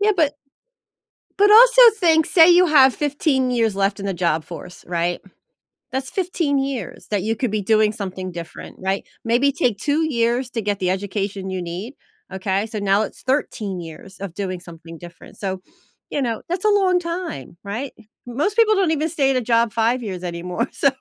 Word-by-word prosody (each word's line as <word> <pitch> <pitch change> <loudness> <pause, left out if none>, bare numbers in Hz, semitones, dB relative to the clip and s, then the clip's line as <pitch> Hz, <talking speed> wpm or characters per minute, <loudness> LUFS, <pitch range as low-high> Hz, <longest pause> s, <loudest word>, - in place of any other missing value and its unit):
Yeah, 425 +1 +3
but 300 -3 +2 1.0
but 410 +1 +5
also - - +8 0.2
think 320 -4 +3
say 330 -1 +6
you 355 +1 +6
have 270 -4 +5
15 285 -3 0
years 225 -4 0
left 200 +1 0
in 200 - -4
the 195 - -2
job 165 -3 0
force, 175 +1 -10
right? 175 0 -1 0.7
That's 265 0 -3
15 340 -6 -1
years, 270 -2 -4
that 205 -3 0
you 220 +3 -1
could 245 +1 -1
be 210 0 -1
doing 215 +1 +3
something 185 -3 -6
different, 170 -1 -9
right? 190 +1 -2 0.2
Maybe 250 +5 +2
take 230 -7 0
2 300 +6 0
years 240 +1 0
to 230 -3 -3
get 205 -1 -1
the 180 -1 0
education 195 0 -3
you 185 -1 -3
need, 180 +9 -6 0.4
okay, 190 +2 -1
so 220 -1 -6
now 200 +1 +2
it's - - -7
13 215 -8 -2
years 170 +4 -11
of 190 -4 -6
doing 185 -3 -4
something 165 -1 -12
different, 175 0 -13
so, 190 -2 -4 0.5
you 285 - -1
know, 230 -3 -2
that's 360 +2 -3
a 425 - +4
long 380 -3 +3
time, 335 - -6
right? 225 +7 -5 0.3
Most 290 - -2
people 445 -2 +5
don't 380 -4 +2
even 315 0 0
stay 285 -4 +1
at 265 - +1
a - - +2
job 230 -1 +1
5 230 +3 +1
years 185 -4 -5
anymore, 180 +6 -3
so, 275 - +2
225 Hz, 190 wpm, -21 LUFS, 190-290 Hz, 1.0 s, also